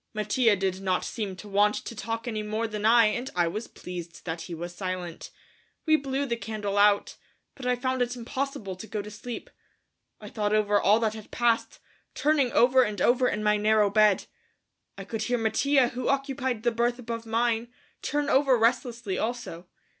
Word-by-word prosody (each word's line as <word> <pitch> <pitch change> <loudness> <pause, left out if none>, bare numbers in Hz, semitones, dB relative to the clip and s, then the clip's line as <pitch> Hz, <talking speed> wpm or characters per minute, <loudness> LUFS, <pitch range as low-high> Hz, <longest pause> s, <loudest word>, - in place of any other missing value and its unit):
Mattia 220 +1 +2
did 190 -1 -2
not 185 -1 0
seem 205 -5 -4
to 210 - -11
want 205 +1 +3
to 230 - -6
talk 225 +2 -4
any 215 -3 -2
more 215 +2 -2
than 210 -1 -4
I 230 +1 +6
and 240 +5 -1
I 175 -1 +2
was 215 +7 -4
pleased 175 -1 -9
that 165 -1 -4
he 170 +1 -6
was 175 +2 -6
silent. 185 -2 -5 0.6
We 315 -1 +5
blew 275 -1 -1
the 235 -3 -1
candle 210 -2 -3
out, 205 0 +3 0.4
but 255 -2 -7
I 250 - +3
found 255 +1 -1
it 245 0 0
impossible 250 -4 -4
to 220 - -9
go 210 -2 -4
to 210 - -9
sleep. 230 +3 -7 0.7
I - - -10
thought 210 -1 -1
over 205 -1 +2
all 210 +3 +4
that 220 -1 +1
had 220 -1 -10
passed, 235 -2 +1 0.4
turning 285 -5 +2
over 255 +2 +5
and 210 -4 -1
over 250 +1 +3
in 215 -2 -2
my 210 0 +3
narrow 210 -1 +3
bed. 210 -2 +4 0.7
I 195 - -6
could 215 +3 -5
hear 245 +2 0
Mattia, 245 +4 +2
who 245 +1 -4
occupied 270 -4 -1
the 240 - +2
berth 235 +1 0
above 230 -2 -6
mine, 230 0 +1 0.3
turn 290 0 -1
over 270 -2 +4
restlessly 235 -3 0
also. 220 -7 -4
225 Hz, 190 wpm, -27 LUFS, 205-245 Hz, 0.7 s, I